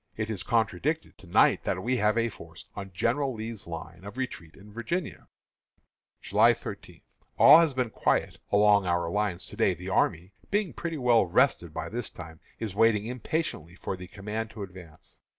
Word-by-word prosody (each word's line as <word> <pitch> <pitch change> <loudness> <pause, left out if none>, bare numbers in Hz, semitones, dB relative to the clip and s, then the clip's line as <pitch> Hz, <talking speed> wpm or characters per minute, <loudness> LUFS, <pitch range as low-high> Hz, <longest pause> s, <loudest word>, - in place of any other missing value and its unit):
It 110 0 -2
is 100 -4 -2
contradicted, 115 - -1
to 95 - -15
night, 85 - +4
that 95 - -2
we 125 +3 +1
have 105 0 +2
a 115 0 +2
force 85 -6 -12
on 95 -1 -7
General 125 +8 0
Lee's 110 -2 -7
line 85 +1 -8
of 100 +5 -9
retreat 90 -11 -5
in 105 +1 -15
Virginia." 170 - -4 0.9
July - - +4
13. - - -9 0.4
All - - +9
has 160 -5 +2
been 125 -3 -1
quiet - - 0
along 100 -1 +5
our 85 -1 0
lines 105 -3 -1
to - - -7
day. 95 - +2
The 90 +3 -7
army, 90 0 0 0.2
being 205 -3 0
pretty 165 -2 -4
well 120 -6 +4
rested 85 - +2
by - - -5
this 120 +2 -4
time, 80 0 -11 0.2
is 110 -4 -4
waiting 105 0 +3
impatiently 125 - -3
for 95 - -4
the 90 0 -9
command 105 +3 -5
to 105 -2 -7
advance. 90 -5 -13
105 Hz, 180 wpm, -28 LUFS, 90-120 Hz, 0.9 s, All